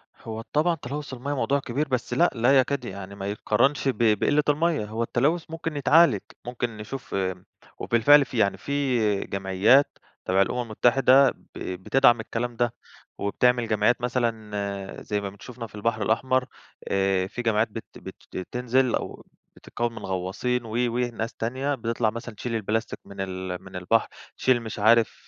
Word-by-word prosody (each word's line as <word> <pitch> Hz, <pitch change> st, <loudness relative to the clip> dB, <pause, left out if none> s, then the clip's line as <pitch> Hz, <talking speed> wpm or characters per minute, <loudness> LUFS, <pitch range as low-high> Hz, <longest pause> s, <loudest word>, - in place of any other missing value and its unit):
هو 110 Hz, 0 st, -7 dB
طبعًا 165 Hz, +3 st, +3 dB
تلوث 145 Hz, 0 st, -6 dB
المَيَّة 135 Hz, +3 st, -4 dB
موضوع 140 Hz, +1 st, +1 dB
كبير، 140 Hz, +3 st, -2 dB
بس 125 Hz, -2 st, -2 dB
لأ 175 Hz, +1 st, +4 dB
لا 125 Hz, +4 st, +4 dB
يكاد 140 Hz, +2 st, 0 dB
يعني 100 Hz, 0 st, -7 dB
ما 100 Hz, 0 st, -5 dB
يتقارنش 135 Hz, +7 st, +1 dB
ب 130 Hz, -, 0 dB, 0.2 s
بقلة 150 Hz, +1 st, +2 dB
المَيَّة، 155 Hz, -5 st, +1 dB
هو 110 Hz, +2 st, -3 dB
التلوث 150 Hz, +9 st, +1 dB
ممكن 165 Hz, -1 st, -4 dB
يتعالج، 165 Hz, +4 st, +5 dB, 0.3 s
ممكن 120 Hz, -2 st, -4 dB
نشوف 115 Hz, +5 st, -7 dB
امم 95 Hz, -1 st, -2 dB, 0.3 s
وبالفعل 140 Hz, +5 st, +5 dB
في 125 Hz, -, -7 dB
يعني 100 Hz, -2 st, +2 dB
في 125 Hz, -8 st, 0 dB
جمعيات 100 Hz, +9 st, +2 dB, 0.3 s
تبع 95 Hz, +1 st, +3 dB
الأمم 125 Hz, +5 st, 0 dB
المتحدة 130 Hz, +4 st, +4 dB
ب -, -, -19 dB
بتدعم 120 Hz, +6 st, +2 dB
الكلام 120 Hz, +2 st, -3 dB
ده، 120 Hz, 0 st, 0 dB, 0.4 s
وبتعمل 120 Hz, +3 st, +1 dB
جمعيات 110 Hz, +3 st, +2 dB
مثلًا 105 Hz, -5 st, -3 dB
زي 105 Hz, -1 st, -2 dB
ما 100 Hz, -, -4 dB
بن 100 Hz, -, -15 dB
شُفنا 120 Hz, -2 st, -8 dB
في 105 Hz, -, -15 dB
البحر 110 Hz, +1 st, -1 dB
الأحمر، 130 Hz, +4 st, +1 dB, 0.5 s
آآ 95 Hz, -1 st, +1 dB
في 125 Hz, -, -5 dB
جمعيات 110 Hz, -1 st, +2 dB
بت 115 Hz, -, -7 dB
بت -, -, -10 dB, 0.2 s
بتنزل 125 Hz, +5 st, 0 dB
أو -, -, -6 dB, 0.3 s
بتتكون 120 Hz, 0 st, -3 dB
من -, -, -6 dB
غواصين 95 Hz, +7 st, -2 dB
و -, -, -8 dB
وناس 120 Hz, -1 st, -1 dB
تانية، 130 Hz, +5 st, -2 dB
بتطلع 115 Hz, -2 st, 0 dB
مثلًا 115 Hz, 0 st, -7 dB
تشيل 115 Hz, +2 st, -4 dB
البلاستيك 110 Hz, +1 st, -2 dB
من 100 Hz, 0 st, -8 dB
ال 95 Hz, -1 st, -4 dB
من 95 Hz, 0 st, -12 dB
البحر، 90 Hz, +5 st, +1 dB, 0.3 s
تشيل 125 Hz, -2 st, +2 dB
مش 110 Hz, -2 st, -6 dB
عارف 115 Hz, +2 st, +3 dB
115 Hz, 165 wpm, -25 LUFS, 105-130 Hz, 0.5 s, يتعالج